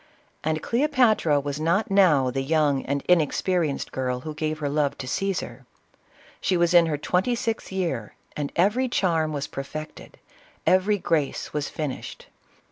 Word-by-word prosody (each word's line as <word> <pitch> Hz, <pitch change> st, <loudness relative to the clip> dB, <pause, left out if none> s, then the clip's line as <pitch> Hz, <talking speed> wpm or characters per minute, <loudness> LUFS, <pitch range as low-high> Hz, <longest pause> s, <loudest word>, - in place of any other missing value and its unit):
— -, -, -38 dB
And 155 Hz, 0 st, -1 dB
Cleopatra 235 Hz, -, +3 dB
was 140 Hz, +1 st, -4 dB
not 170 Hz, +7 st, +1 dB
now 155 Hz, -10 st, +4 dB
the 135 Hz, +2 st, -2 dB
young 145 Hz, -1 st, +1 dB
and 140 Hz, 0 st, -1 dB
inexperienced 170 Hz, -2 st, +1 dB
girl 125 Hz, -1 st, -2 dB
who 155 Hz, +3 st, -6 dB
gave 155 Hz, 0 st, -2 dB
her 150 Hz, -2 st, -3 dB
love 145 Hz, 0 st, 0 dB
to 130 Hz, -, -6 dB
Caesar. 195 Hz, +7 st, -3 dB, 0.7 s
She 185 Hz, -, +1 dB
was 175 Hz, 0 st, +2 dB
in 170 Hz, -1 st, +6 dB
her 150 Hz, -2 st, -1 dB
twenty 185 Hz, -, 0 dB
sixth 225 Hz, -3 st, -3 dB
year, 165 Hz, -, -3 dB, 0.2 s
and 145 Hz, -1 st, -3 dB
every 215 Hz, +9 st, +2 dB
charm 165 Hz, -8 st, +1 dB
was 145 Hz, -2 st, -3 dB
perfected, 155 Hz, +3 st, -8 dB, 0.5 s
every 190 Hz, +3 st, +3 dB
grace 160 Hz, -7 st, -1 dB
was 150 Hz, -1 st, -2 dB
finished. 150 Hz, -4 st, -5 dB
155 Hz, 155 wpm, -25 LUFS, 145-185 Hz, 0.7 s, in